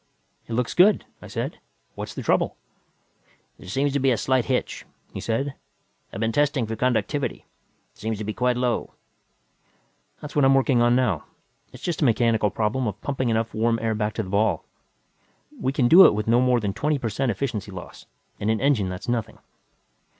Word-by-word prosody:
"It 115 Hz, -, -5 dB
looks 120 Hz, 0 st, -1 dB
good," 195 Hz, +3 st, +4 dB, 0.2 s
I -, -, -10 dB
said. -, -, -4 dB, 0.3 s
"What's -, -, -7 dB
the -, -, -5 dB
trouble?" -, -, +1 dB, 1.0 s
"There -, -, -11 dB
seems 135 Hz, +7 st, 0 dB
to 140 Hz, -, +1 dB
be 135 Hz, 0 st, +2 dB
a 120 Hz, -, +2 dB
slight 130 Hz, +2 st, +1 dB
hitch," 130 Hz, -1 st, -2 dB, 0.3 s
he -, -, -5 dB
said. 135 Hz, +5 st, -2 dB, 0.6 s
"I've -, -, -7 dB
been 115 Hz, 0 st, 0 dB
testing 140 Hz, -1 st, +1 dB
for 110 Hz, +1 st, -4 dB
conductivity. 130 Hz, +4 st, -1 dB, 0.5 s
It -, -, -26 dB
seems 110 Hz, +2 st, -3 dB
to 110 Hz, -, -5 dB
be 105 Hz, +1 st, -3 dB
quite 125 Hz, +1 st, +1 dB
low." 125 Hz, -1 st, -1 dB, 1.2 s
"That's 150 Hz, 0 st, -9 dB
what 145 Hz, -, +3 dB
I'm 135 Hz, 0 st, +5 dB
working 130 Hz, -2 st, +3 dB
on 120 Hz, 0 st, +4 dB
now. 110 Hz, -, +1 dB, 0.5 s
It's -, -, -13 dB
just 170 Hz, -2 st, -2 dB
a -, -, +4 dB
mechanical 115 Hz, -3 st, +2 dB
problem 115 Hz, +5 st, -1 dB
of 105 Hz, -1 st, -4 dB
pumping 130 Hz, -3 st, -1 dB
enough 115 Hz, 0 st, 0 dB
warm 115 Hz, +1 st, +1 dB
air 110 Hz, 0 st, -1 dB
back 105 Hz, 0 st, -2 dB
to 110 Hz, -, -1 dB
the 95 Hz, -, -8 dB
ball. 100 Hz, -3 st, +1 dB, 0.9 s
We 130 Hz, -, 0 dB
can 135 Hz, -3 st, +2 dB
do 180 Hz, +8 st, +9 dB
it -, -, +2 dB
with 105 Hz, +1 st, -3 dB
no 120 Hz, +2 st, +4 dB
more 125 Hz, -1 st, +3 dB
than 105 Hz, -3 st, -2 dB
a -, -, -10 dB
twenty 145 Hz, +7 st, 0 dB
per 120 Hz, -4 st, -3 dB
cent 130 Hz, +5 st, -1 dB
efficiency 110 Hz, -2 st, -3 dB
loss. 90 Hz, -4 st, -10 dB, 0.3 s
In 105 Hz, -, -1 dB
an 110 Hz, -1 st, +1 dB
engine, 130 Hz, -9 st, +2 dB
that's 90 Hz, +5 st, -7 dB
nothing." 120 Hz, -2 st, -2 dB
120 Hz, 200 wpm, -24 LUFS, 110-135 Hz, 1.2 s, do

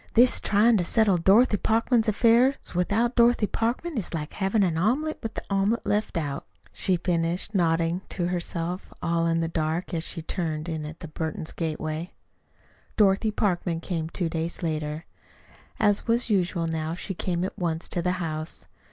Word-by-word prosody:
"This 245 Hz, +2 st, +6 dB
tryin' 215 Hz, +3 st, +4 dB
to 180 Hz, -, +1 dB
settle 205 Hz, 0 st, +3 dB
Dorothy 205 Hz, +6 st, +5 dB
Parkman's 225 Hz, +2 st, +2 dB
affairs 235 Hz, +5 st, +4 dB, 0.2 s
without 210 Hz, +7 st, +1 dB
Dorothy 235 Hz, -2 st, +4 dB
Parkman 240 Hz, +8 st, -1 dB
is 180 Hz, -, -4 dB
like 150 Hz, -1 st, -5 dB
havin' 200 Hz, +1 st, +1 dB
omelet 260 Hz, -, 0 dB
with 225 Hz, -1 st, -6 dB
omelet 200 Hz, +3 st, +1 dB
left 210 Hz, -3 st, 0 dB
out," 145 Hz, -4 st, -3 dB, 0.3 s
she 185 Hz, -2 st, +2 dB
finished, 170 Hz, +3 st, -1 dB
nodding 170 Hz, -1 st, +1 dB
to 175 Hz, -1 st, -2 dB
herself 175 Hz, 0 st, -3 dB
all 170 Hz, 0 st, +1 dB
in 165 Hz, 0 st, +1 dB
the 165 Hz, -, 0 dB
dark, 160 Hz, +2 st, -2 dB
as 165 Hz, -1 st, -1 dB
she 165 Hz, -1 st, -3 dB
turned 160 Hz, -2 st, -3 dB
in 160 Hz, -2 st, -3 dB
at 155 Hz, +2 st, -10 dB
the 165 Hz, -, -6 dB
Burton 160 Hz, 0 st, -4 dB
gateway. 160 Hz, +1 st, -3 dB, 0.9 s
Dorothy 205 Hz, +1 st, +4 dB
Parkman 180 Hz, -5 st, 0 dB
came 165 Hz, -2 st, -3 dB
two 175 Hz, 0 st, -1 dB
days 165 Hz, +2 st, -4 dB
later. 155 Hz, 0 st, -3 dB, 0.7 s
As 205 Hz, -1 st, +2 dB
was 235 Hz, 0 st, +2 dB
usual 180 Hz, -3 st, +1 dB
now 160 Hz, 0 st, -2 dB
she 195 Hz, +2 st, -5 dB
came 175 Hz, -1 st, -2 dB
at 190 Hz, -, -3 dB
once 165 Hz, -2 st, -2 dB
to 175 Hz, -, -1 dB
the 180 Hz, +1 st, 0 dB
house. 155 Hz, -3 st, -4 dB
180 Hz, 165 wpm, -26 LUFS, 165-215 Hz, 0.9 s, This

